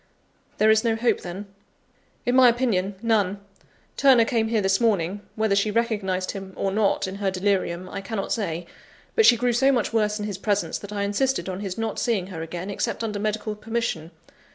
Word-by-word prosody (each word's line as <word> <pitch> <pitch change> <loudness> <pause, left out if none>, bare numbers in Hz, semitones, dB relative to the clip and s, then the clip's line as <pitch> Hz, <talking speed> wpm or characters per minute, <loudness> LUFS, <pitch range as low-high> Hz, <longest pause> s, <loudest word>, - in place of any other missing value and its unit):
"There 215 +1 +5
is 220 0 +3
no 230 -2 +2
hope, 235 +2 +1
then?" 185 +3 -6 0.8
"In 245 - +2
my 255 -1 +8
opinion, 215 -6 0
none. 205 -4 +1 0.6
Turner 260 -5 +6
came 225 -1 +1
here 225 -1 +1
this 195 0 +1
morning, 200 -3 +1
whether 220 -2 +1
she 200 +2 +2
recognised 205 -5 -1
him, 195 -1 -8
or 195 - -1
not, 205 0 +1
in 190 +1 -6
her 200 -1 0
delirium, 185 -2 -1
I 200 +1 -6
cannot 200 0 -4
say; 175 -6 -3 0.5
but 450 - +5
she 240 - +7
grew 245 +1 +1
so 265 +3 +4
much 240 -4 0
worse 210 -2 +1
in 210 - -4
his 200 -2 -5
presence, 200 -5 -1
that 205 - -9
I 205 -1 -2
insisted 255 +6 0
on 185 0 -4
his 195 -3 -5
not 225 -1 -2
seeing 220 -7 0
her 165 - -5
again, 175 +4 -5
except 200 - -2
under 210 -2 -3
medical 215 0 -2
permission. 220 -7 -3
210 Hz, 200 wpm, -24 LUFS, 195-225 Hz, 0.8 s, my